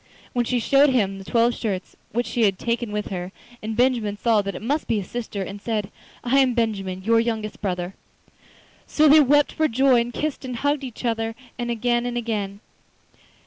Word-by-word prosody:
Then 245 Hz, -1 st, +1 dB
she 245 Hz, +1 st, 0 dB
showed 275 Hz, +5 st, +4 dB
him 200 Hz, -7 st, +1 dB
the -, -, -8 dB
twelve 235 Hz, +4 st, +2 dB
shirts 195 Hz, -6 st, -4 dB, 0.2 s
which 240 Hz, +3 st, 0 dB
she 240 Hz, -, -2 dB
had 195 Hz, -2 st, +1 dB
taken 235 Hz, 0 st, -2 dB
with 210 Hz, 0 st, -3 dB
her, 180 Hz, -1 st, -5 dB, 0.3 s
and 220 Hz, 0 st, -4 dB
Benjamin 240 Hz, -5 st, +2 dB
saw 225 Hz, -1 st, +3 dB
that 200 Hz, 0 st, -5 dB
it -, -, -6 dB
must 290 Hz, +6 st, -1 dB
be 225 Hz, -, +1 dB
his 190 Hz, -, -6 dB
sister, 220 Hz, -5 st, -4 dB
and 195 Hz, +2 st, -8 dB
said: 215 Hz, -2 st, -2 dB, 0.3 s
'I 260 Hz, +3 st, +3 dB
am 260 Hz, -2 st, +4 dB
Benjamin, 195 Hz, -5 st, -1 dB
your 225 Hz, +2 st, +4 dB
youngest 220 Hz, -2 st, -2 dB
brother.' 180 Hz, -2 st, -2 dB, 0.9 s
So 310 Hz, 0 st, +4 dB
they 300 Hz, +2 st, +8 dB
wept 290 Hz, 0 st, +4 dB
for 315 Hz, -, +1 dB
joy, 255 Hz, 0 st, +4 dB
and 235 Hz, +1 st, -4 dB
kissed 300 Hz, +2 st, -3 dB
and 255 Hz, -2 st, -5 dB
hugged 285 Hz, +3 st, 0 dB
each 250 Hz, -1 st, -7 dB
other 225 Hz, -1 st, -1 dB, 0.2 s
again 240 Hz, 0 st, 0 dB
and 240 Hz, 0 st, -3 dB
again. 210 Hz, -4 st, -3 dB
230 Hz, 195 wpm, -23 LUFS, 205-245 Hz, 0.9 s, they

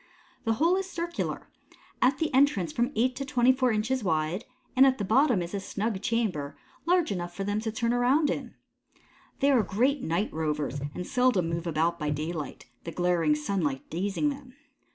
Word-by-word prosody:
The 225 Hz, -, +2 dB
hole 335 Hz, +10 st, +3 dB
is 385 Hz, -1 st, -3 dB
circular, 340 Hz, -1 st, -4 dB, 0.5 s
at 260 Hz, +3 st, +4 dB
the 315 Hz, -3 st, -1 dB
entrance 255 Hz, -, +3 dB
from 240 Hz, +3 st, 0 dB
eight 250 Hz, +3 st, +2 dB
to 275 Hz, -, -2 dB
twenty 255 Hz, -2 st, +3 dB
four 255 Hz, -1 st, +2 dB
inches 225 Hz, +4 st, 0 dB
wide, 165 Hz, +4 st, -1 dB, 0.3 s
and 260 Hz, -, +7 dB
at 260 Hz, 0 st, +2 dB
the 205 Hz, -, -2 dB
bottom 240 Hz, -2 st, +3 dB
is 170 Hz, -, -8 dB
a 200 Hz, -, -1 dB
snug 200 Hz, +1 st, -3 dB
chamber 210 Hz, -12 st, -1 dB, 0.3 s
large 355 Hz, -, +3 dB
enough 175 Hz, -2 st, -4 dB
for 195 Hz, -, -3 dB
them 205 Hz, +1 st, -1 dB
to 220 Hz, 0 st, -3 dB
turn 230 Hz, +2 st, 0 dB
around 260 Hz, +5 st, +3 dB
in. -, -, -5 dB, 0.9 s
They 280 Hz, +1 st, +4 dB
are 255 Hz, -4 st, +5 dB
great 245 Hz, +8 st, +1 dB
night 175 Hz, +7 st, -1 dB
rovers 150 Hz, -3 st, -2 dB
and 180 Hz, -, -4 dB
seldom 245 Hz, -9 st, +2 dB
move 165 Hz, +1 st, -3 dB
about 165 Hz, +2 st, 0 dB
by 150 Hz, -1 st, -1 dB
daylight, 155 Hz, 0 st, -4 dB, 0.2 s
the 165 Hz, -, -5 dB
glaring 170 Hz, -2 st, +2 dB
sunlight 150 Hz, -4 st, -2 dB
dazing 195 Hz, -, 0 dB
them. 270 Hz, -3 st, -8 dB
215 Hz, 185 wpm, -28 LUFS, 170-260 Hz, 0.9 s, and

